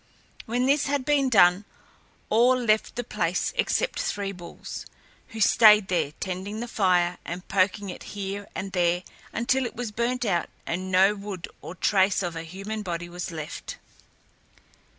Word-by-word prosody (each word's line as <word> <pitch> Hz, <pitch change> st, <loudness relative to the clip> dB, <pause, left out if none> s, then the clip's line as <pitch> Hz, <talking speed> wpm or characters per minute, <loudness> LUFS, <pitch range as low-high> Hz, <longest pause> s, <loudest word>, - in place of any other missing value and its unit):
When 245 Hz, +3 st, 0 dB
this 285 Hz, +2 st, +3 dB
had 280 Hz, -2 st, -1 dB
been 280 Hz, -2 st, +3 dB
done, 185 Hz, -4 st, +5 dB, 0.7 s
all 240 Hz, +4 st, +5 dB
left 220 Hz, -3 st, +1 dB
the 245 Hz, -, -2 dB
place 180 Hz, -6 st, -1 dB
except -, -, 0 dB
Three 200 Hz, -1 st, -2 dB
Bulls, 175 Hz, -3 st, -9 dB, 0.4 s
who 225 Hz, -, -9 dB
stayed 210 Hz, -1 st, +6 dB
there, 170 Hz, -5 st, 0 dB
tending 190 Hz, +3 st, -4 dB
the 240 Hz, -, -4 dB
fire 180 Hz, -5 st, +2 dB
and 175 Hz, +2 st, -6 dB
poking 195 Hz, +1 st, +1 dB
it -, -, -10 dB, 0.2 s
here 200 Hz, 0 st, -4 dB
and 195 Hz, -, -4 dB
there, 175 Hz, -1 st, +1 dB, 0.3 s
until 260 Hz, +3 st, +1 dB
it 240 Hz, -, -5 dB
was 235 Hz, -2 st, -4 dB
burnt 240 Hz, +3 st, -1 dB
out 175 Hz, -5 st, 0 dB, 0.2 s
and 185 Hz, +3 st, -3 dB
no 190 Hz, +2 st, +5 dB
wood 200 Hz, -3 st, -6 dB
or 175 Hz, -, -8 dB
trace 190 Hz, +1 st, +2 dB
of 175 Hz, -2 st, -3 dB
a 165 Hz, -, -4 dB
human 195 Hz, +6 st, -6 dB
body 175 Hz, -3 st, -4 dB
was 175 Hz, +1 st, -5 dB
left. 155 Hz, -3 st, -6 dB
195 Hz, 160 wpm, -26 LUFS, 180-225 Hz, 0.7 s, stayed